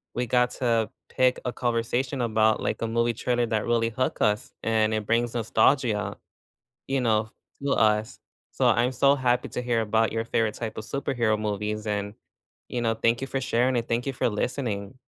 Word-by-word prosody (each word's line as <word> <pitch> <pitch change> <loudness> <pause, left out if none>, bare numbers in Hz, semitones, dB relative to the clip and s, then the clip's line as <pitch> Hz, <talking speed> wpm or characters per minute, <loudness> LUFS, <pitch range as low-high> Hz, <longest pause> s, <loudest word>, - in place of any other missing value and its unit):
we 125 0 -1
got 125 +1 +3
to 115 -3 +1 0.2
pick 130 0 +2
a 125 - -2
conversation 120 +2 -1
about, 110 -1 +2
like, - - -2
a 115 - 0
movie 115 +1 +1
trailer 120 +1 0
that 110 -1 0
really 115 -1 +2
hook 130 +3 -2
us, 105 0 +1
and 110 -1 +2
it 110 -1 -1
brings 115 +1 +1
nostalgia, 110 -2 +1 0.7
you 135 0 +1
know, 110 -2 +1 0.3
to 140 - -1
us. 110 0 +2 0.3
So - - +1
I'm 120 +3 +3
so 140 +2 +4
happy 125 -2 +1
to 125 - -3
hear 120 -2 +1
about 110 +1 +1
your 115 0 -1
favorite 115 -2 +1
type 115 -2 -5
of 110 - -5
superhero 120 -4 0
movies 105 +1 -3
and, 100 -1 -2 0.6
you 120 -1 -3
know, 115 -1 +2
thank 115 +2 +1
you - - -1
for 135 0 -2
sharing 125 0 +1
it. 115 -1 -2
Thank 115 +1 0
you 135 - -1
for 120 - 0
listening 110 0 -3
115 Hz, 190 wpm, -26 LUFS, 110-125 Hz, 0.7 s, so